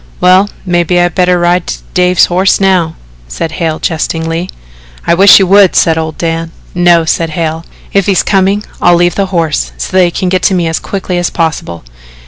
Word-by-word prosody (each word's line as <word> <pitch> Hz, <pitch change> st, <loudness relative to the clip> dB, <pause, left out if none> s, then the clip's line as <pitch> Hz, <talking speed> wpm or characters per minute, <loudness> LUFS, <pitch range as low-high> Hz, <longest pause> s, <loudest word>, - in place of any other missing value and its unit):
"Well, 185 Hz, +3 st, +3 dB, 0.2 s
maybe 175 Hz, -1 st, 0 dB
I'd 175 Hz, -1 st, +1 dB
better 180 Hz, -1 st, +2 dB
ride 175 Hz, 0 st, 0 dB, 0.2 s
Dave's 180 Hz, -1 st, +3 dB
horse 185 Hz, +2 st, +1 dB
now," 185 Hz, -4 st, +1 dB, 0.3 s
said 105 Hz, -, -5 dB
Hale 160 Hz, -2 st, -2 dB
jestingly. 165 Hz, +1 st, -3 dB, 0.6 s
"I 170 Hz, -, +2 dB
wish 190 Hz, +3 st, +7 dB
you 195 Hz, -, +3 dB
would," 195 Hz, 0 st, +4 dB
said 165 Hz, -, +3 dB
old 160 Hz, -1 st, -4 dB
Dan. 165 Hz, 0 st, -3 dB, 0.2 s
"No," 175 Hz, -2 st, +3 dB
said 165 Hz, +1 st, -1 dB
Hale, 160 Hz, -1 st, -3 dB, 0.3 s
"if 195 Hz, -2 st, +1 dB
he's 195 Hz, -2 st, +2 dB
coming, 195 Hz, +1 st, +1 dB, 0.2 s
I'll 175 Hz, 0 st, +4 dB
leave 175 Hz, 0 st, +1 dB
the 200 Hz, -1 st, -1 dB
horse 165 Hz, -4 st, -2 dB
so -, -, -5 dB
that 185 Hz, -1 st, +5 dB
he -, -, 0 dB
can 180 Hz, +1 st, -3 dB
get 185 Hz, 0 st, 0 dB
to 190 Hz, -, +1 dB
me 175 Hz, -2 st, 0 dB
as 160 Hz, -, -2 dB
quickly 185 Hz, -2 st, -4 dB
as 175 Hz, -, -1 dB
possible. 160 Hz, -, -3 dB
175 Hz, 190 wpm, -10 LUFS, 165-185 Hz, 0.6 s, wish